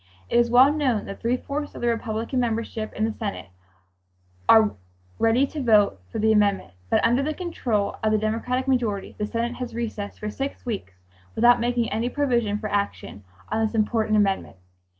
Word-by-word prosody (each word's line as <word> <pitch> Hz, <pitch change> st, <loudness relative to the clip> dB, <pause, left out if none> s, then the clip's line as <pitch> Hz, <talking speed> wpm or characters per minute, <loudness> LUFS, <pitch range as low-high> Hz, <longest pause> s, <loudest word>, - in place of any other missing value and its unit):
It 235 Hz, -, +4 dB
is 235 Hz, 0 st, +3 dB
well 255 Hz, +4 st, +6 dB
known 260 Hz, -8 st, 0 dB
that 200 Hz, -, -8 dB
three 235 Hz, +2 st, +1 dB
fourths 290 Hz, +3 st, -5 dB
of -, -, -8 dB
the 240 Hz, -, 0 dB
Republican 230 Hz, +2 st, -1 dB
membership 225 Hz, -2 st, -2 dB
in 215 Hz, -, 0 dB
the 225 Hz, -, -1 dB
Senate 205 Hz, -, -5 dB, 1.0 s
are 220 Hz, -2 st, +6 dB, 0.5 s
ready 230 Hz, +4 st, +3 dB
to 295 Hz, +1 st, -6 dB
vote 210 Hz, -, +3 dB
for -, -, -4 dB
the 220 Hz, +1 st, +3 dB
amendment, 200 Hz, -, +2 dB, 0.2 s
but -, -, +3 dB
under 240 Hz, +3 st, +3 dB
the 305 Hz, +2 st, -2 dB
control 245 Hz, -, -2 dB
of 215 Hz, -, +1 dB
the 215 Hz, -, +3 dB
Democratic 230 Hz, +5 st, -1 dB
majority 235 Hz, -7 st, 0 dB
the 210 Hz, -, -1 dB
Senate 235 Hz, +2 st, -2 dB
has 250 Hz, -2 st, -6 dB
recessed 220 Hz, -3 st, -4 dB
for 210 Hz, 0 st, -4 dB
six 275 Hz, +4 st, -5 dB
weeks 205 Hz, -, -4 dB, 0.4 s
without 240 Hz, +1 st, +5 dB
making 240 Hz, -1 st, 0 dB
any 225 Hz, +4 st, -1 dB
provision 240 Hz, -7 st, 0 dB
for 215 Hz, 0 st, -5 dB
action 200 Hz, -, -3 dB, 0.3 s
on 220 Hz, +1 st, 0 dB
this 220 Hz, +1 st, -1 dB
important 215 Hz, 0 st, +1 dB
amendment. 195 Hz, -, 0 dB
225 Hz, 185 wpm, -24 LUFS, 215-245 Hz, 1.0 s, well